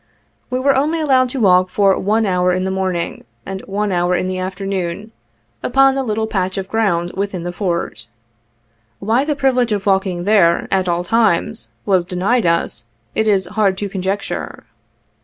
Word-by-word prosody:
We 255 - -1
were 275 +1 +3
only 305 +5 +1
allowed 260 -4 +3
to 265 - -3
walk 185 -3 +4
for 195 0 +3
one 215 +3 +1
hour 180 -2 +2
in 185 +1 -1
the 190 - -1
morning, 185 -3 -2 0.2
and 190 0 -5
one 205 +1 -1
hour 175 0 +1
in 185 - -1
the 185 0 -3
afternoon, 190 +1 -4 0.5
upon 270 +1 +4
the 270 - -1
little 220 -3 -1
patch 190 -3 -2
of 190 -1 -3
ground 180 -6 0
within 195 -2 -3
the 175 - -3
Fort. 170 - -3 0.9
Why 225 - +1
the 300 0 -1
privilege 255 -4 +1
of 205 -2 -1
walking 190 -3 +1
there, 195 -4 +3
at 190 -2 +1
all 175 0 0
times, 180 - +1 0.2
was 190 -3 +3
denied 190 +5 0
us, 170 -8 -1 0.3
it 220 - 0
is 195 -3 +3
hard 195 0 0
to 205 0 -3
conjecture. 195 +1 -4
195 Hz, 175 wpm, -18 LUFS, 180-220 Hz, 0.9 s, walk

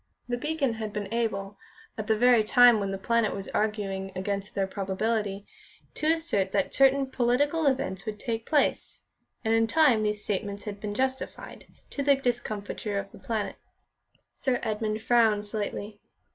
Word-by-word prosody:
The 245 - -1
Beacon 290 -1 -1
had 215 -1 -3
been 210 +1 -4
able, 200 -4 -2 0.4
at 215 -1 -5
the 220 - +2
very 245 -1 +5
time 240 +1 +6
when 200 -1 -2
The 195 - -3
Planet 230 +2 +1
was 195 -1 -6
arguing 200 -3 -2
against 200 +2 -3
their 195 - +1
probability, 200 +1 -2 0.5
to 310 +1 +1
assert 210 - -1
that 195 -2 0
certain 275 0 +5
political 270 +5 +1
events 220 -7 -1
would 210 -1 -4
take 225 0 -3
place, 295 -2 0 0.4
and 220 - +2
in 225 0 +3
time 260 -5 +4
these 210 -1 -1
statements 200 0 -3
had 205 -1 -6
been 205 0 -4
justified, 260 +2 -3 0.2
to 280 - -3
the 280 0 +5
discomfiture 215 -5 -3
of 195 0 -4
The - - -13
Planet. 210 +2 -3 0.8
Sir 255 -2 -1
Edmund 215 -1 -2
frowned 225 -4 +3
slightly. 205 0 -4
215 Hz, 160 wpm, -27 LUFS, 200-245 Hz, 0.8 s, time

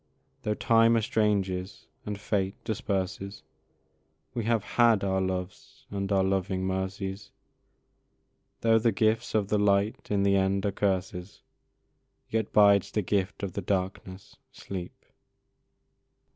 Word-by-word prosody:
Though 105 - -1
time 115 +1 +4
estranges 100 -4 -1 0.2
and 105 -1 -4
fate 100 -2 -1
disperses, 100 -1 -3 0.9
We 115 -3 -3
have 115 -2 +1
HAD 115 -4 +3
our 95 -1 +1
loves 95 +2 -5
and 100 0 -3
our 95 -1 +3
loving 95 0 0
mercies; 95 +1 -3 1.3
Though 115 -1 +4
the 115 +1 +2
gifts 110 +3 0
of 105 -2 +1
the 105 - +2
light 100 +1 +1
in 100 -1 +1
the 100 0 +3
end 95 +1 +1
are 100 - +1
curses, 95 -1 -2 0.9
Yet 110 -2 -1
bides 100 -1 +5
the 105 +1 -1
gift 100 +1 -1
of 95 -3 -3
the - - -3
darkness 95 0 -4
sleep! 90 -3 -8
100 Hz, 125 wpm, -28 LUFS, 95-105 Hz, 1.3 s, bides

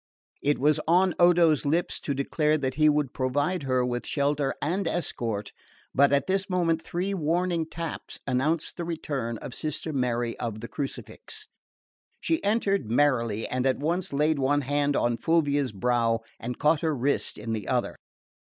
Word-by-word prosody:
It 145 +1 +2
was 150 +3 +3
on 180 +2 +4
Odo's 170 -4 +5
lips 160 +4 0
to 140 - -3
declare 150 +3 +1
that 130 -3 -2
he 155 +2 +4
would 145 -3 +1
provide 145 +7 0
her 130 -2 +1
with 120 -1 -3
shelter 140 -1 0
and 175 +4 -1
escort; 115 -12 -2 0.4
but 140 +1 +5
at 140 0 +3
this 195 +1 0
moment 170 -3 +1
three 180 +4 -2
warning 170 -1 0
taps 165 0 -6
announced 145 +5 0
the 175 - -3
return 140 -8 -3
of 125 - -6
Sister 155 +2 -3
Mary 120 -3 0
of 110 -2 -3
the 115 - -6
Crucifix. 140 +1 -6 0.7
She 325 - 0
entered 200 - +1
merrily 115 -4 +2
and 130 +1 0
at 130 - +2
once 170 +5 -1
laid 150 +1 +1
one 145 +2 +2
hand 145 +1 0
on 120 -1 +1
Fulvia's 145 -5 +1
brow 115 +2 +1 0.2
and 120 +1 -5
caught 150 +1 +3
her 160 -2 0
wrist 140 +3 -1
in 115 +2 -4
the 105 -4 -4
other. - - 0
145 Hz, 165 wpm, -27 LUFS, 125-165 Hz, 0.7 s, Odo's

